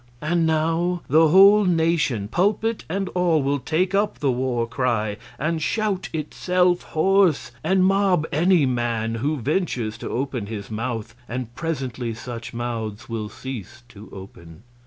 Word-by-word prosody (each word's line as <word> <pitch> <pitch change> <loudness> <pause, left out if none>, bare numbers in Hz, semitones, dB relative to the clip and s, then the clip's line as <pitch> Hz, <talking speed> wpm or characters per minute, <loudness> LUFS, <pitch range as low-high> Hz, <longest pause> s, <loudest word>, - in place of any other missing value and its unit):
And 165 +2 +1
now 165 +2 0
the 160 +4 +5
whole 195 +5 +7
nation 160 - +1
pulpit 210 - 0
and 195 +3 -2
all 175 -5 +1
will 140 +1 0
take 180 +7 0
up 200 -8 +1
the 135 +1 +1
war 125 -1 -1
cry, 115 -4 -1 0.2
and 160 +2 -1
shout 200 +4 -1
itself 180 +3 +1
hoarse, 170 -6 +2
and 190 -1 +3
mob 195 -4 +3
any 175 +1 +3
honest 130 -2 +1
man 115 -1 -1
who 150 +3 0
ventures 125 - -2
to - - -5
open 125 -4 -3
his 105 -1 -7
mouth; 115 0 -4 0.2
and 125 -1 -5
presently 130 -6 -3
such 115 0 -7
mouths 115 -2 -5
will 110 -2 -4
cease 120 -2 -8
to 105 0 -13
open. 85 -2 -12
140 Hz, 150 wpm, -23 LUFS, 115-175 Hz, 0.2 s, whole